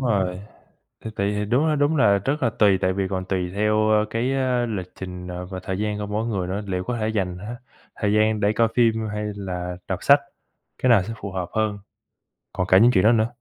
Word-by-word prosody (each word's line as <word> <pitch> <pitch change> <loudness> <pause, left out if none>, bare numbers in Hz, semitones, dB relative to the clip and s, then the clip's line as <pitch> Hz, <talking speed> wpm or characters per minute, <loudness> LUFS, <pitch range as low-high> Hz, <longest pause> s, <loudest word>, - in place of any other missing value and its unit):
rồi. 95 -7 0 0.6
Thì 110 - -4
tùy, 100 +1 0
thì 105 0 -1
đúng 125 +9 +2
là 155 - +2
đúng 145 +2 +2
là 100 -6 +4
rất 135 - -2
là 120 - +2
tùy 100 -3 +3
tại 95 - +1
vì 95 0 -1
còn 95 -1 -3
tùy 90 -1 -2
theo, 105 +1 +2
ơ, 105 0 +3
cái, 120 +4 -1
ơ, 130 -2 +1
lịch 95 -5 -5
trình, 90 -1 -7
ờ, 90 0 -6
và 95 -1 -6
thời 95 -1 -3
gian 105 0 -2
của 105 - -4
mỗi 105 +2 -2
người 95 -6 -2
nữa, 100 +3 -2
liệu 90 -1 -2
có 125 -1 -2
thể 110 0 -1
dành, 95 -5 -2
a, 110 +6 -7 0.4
thời 105 -1 +1
gian 110 0 +2
để 105 0 +2
coi 115 +1 +2
phim 115 -2 +2
hay 105 0 -4
là 90 -2 -4
đọc 95 - -1
sách, 140 +1 +6 0.6
cái 130 - +3
nào 110 -5 +6
sẽ 115 +5 -6
phù 100 - -7
hợp 90 -2 -3
hơn, 110 -2 0 0.8
còn 90 0 -1
cả 95 - +6
những 115 +5 +6
chuyện 95 -6 +3
đó 110 - +6
nữa. 110 -1 +3
105 Hz, 245 wpm, -23 LUFS, 95-115 Hz, 0.8 s, sách